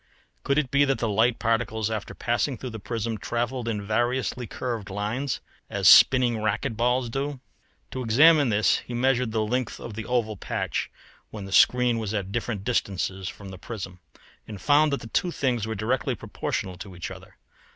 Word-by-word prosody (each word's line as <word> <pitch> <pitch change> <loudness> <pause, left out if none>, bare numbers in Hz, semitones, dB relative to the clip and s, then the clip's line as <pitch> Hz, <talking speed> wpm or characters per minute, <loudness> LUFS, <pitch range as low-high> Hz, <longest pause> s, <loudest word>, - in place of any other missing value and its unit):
Could 140 - 0
it 145 -4 0
be 140 0 +4
that 135 -3 +1
the 115 - -1
light 110 +3 +2
particles 110 -1 0
after 110 -1 -4
passing 120 +2 -1
through 125 +2 -6
the 110 - -7
prism 115 +1 -3
travelled 120 +3 -2
in 105 -3 -2
variously 120 +3 -1
curved 115 -5 -4
lines, 110 +7 -2 0.3
as - - +1
spinning 125 -4 +7
racquet 110 +1 -1
balls 125 +2 +1
do? 135 +3 -3 0.5
To 130 - -4
examine 145 +5 +5
this 105 0 +3
he 120 - -7
measured 125 -1 +1
the 110 -1 0
length 125 +2 -2
of 115 - -7
the 110 +1 -6
oval 115 -4 0
patch - - -3 0.4
when 105 -3 -7
the 95 - -9
screen 125 +2 +4
was 110 -1 -3
at 100 -2 -3
different 110 -2 -3
distances 95 -4 -1
from 100 -1 -10
the 95 -1 -9
prism, 95 -5 -7 0.5
and 105 -3 -8
found 150 +7 +4
that 140 - -1
the - - -8
two 175 - 0
things 125 - -1
were 110 - -3
directly 110 +6 -1
proportional 90 -1 -4
to 95 -1 -9
each 85 - -6
other. - - -12
115 Hz, 185 wpm, -26 LUFS, 105-125 Hz, 0.5 s, spinning